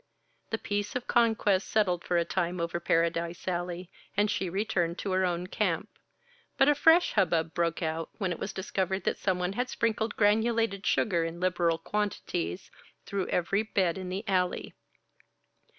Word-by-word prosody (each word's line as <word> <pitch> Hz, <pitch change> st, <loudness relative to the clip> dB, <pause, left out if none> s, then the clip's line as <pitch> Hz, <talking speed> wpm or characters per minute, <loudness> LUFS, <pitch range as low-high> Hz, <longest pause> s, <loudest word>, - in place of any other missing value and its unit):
The 225 Hz, -, -1 dB
peace 205 Hz, 0 st, -3 dB
of 250 Hz, -, -2 dB
conquest 220 Hz, -5 st, +2 dB
settled 185 Hz, -5 st, +1 dB
for 175 Hz, -, 0 dB
a 170 Hz, -, +2 dB
time 175 Hz, +1 st, -1 dB
over 170 Hz, 0 st, -2 dB
Paradise 170 Hz, +1 st, 0 dB
Alley, 175 Hz, 0 st, -3 dB, 0.3 s
and 205 Hz, 0 st, +3 dB
she 185 Hz, -, -1 dB
returned 175 Hz, -3 st, -1 dB
to 195 Hz, -, -3 dB
her 185 Hz, 0 st, +2 dB
own 175 Hz, 0 st, -1 dB
camp. 185 Hz, -, -1 dB, 0.7 s
But 270 Hz, -, +5 dB
a 295 Hz, -, +6 dB
fresh 325 Hz, +4 st, +5 dB
hub 185 Hz, -, +3 dB
bub 165 Hz, -1 st, 0 dB
broke 170 Hz, 0 st, 0 dB
out, 160 Hz, 0 st, -2 dB
when 190 Hz, -4 st, -1 dB
it 170 Hz, -, -4 dB
was 195 Hz, -, -3 dB
discovered 190 Hz, 0 st, -2 dB
that -, -, -1 dB
someone 180 Hz, -1 st, 0 dB
had 250 Hz, +4 st, -1 dB
sprinkled 225 Hz, -1 st, -1 dB
granulated 220 Hz, -1 st, +2 dB
sugar, 175 Hz, -6 st, +2 dB
in 165 Hz, +1 st, -4 dB
liberal 175 Hz, -2 st, +1 dB
quantities, 190 Hz, -1 st, -3 dB, 0.3 s
through 195 Hz, -2 st, -2 dB
every 190 Hz, +4 st, +1 dB
bed 190 Hz, -5 st, 0 dB
in 185 Hz, -1 st, -5 dB
the 195 Hz, +4 st, -4 dB
Alley. 180 Hz, -2 st, 0 dB
185 Hz, 165 wpm, -29 LUFS, 170-210 Hz, 0.7 s, a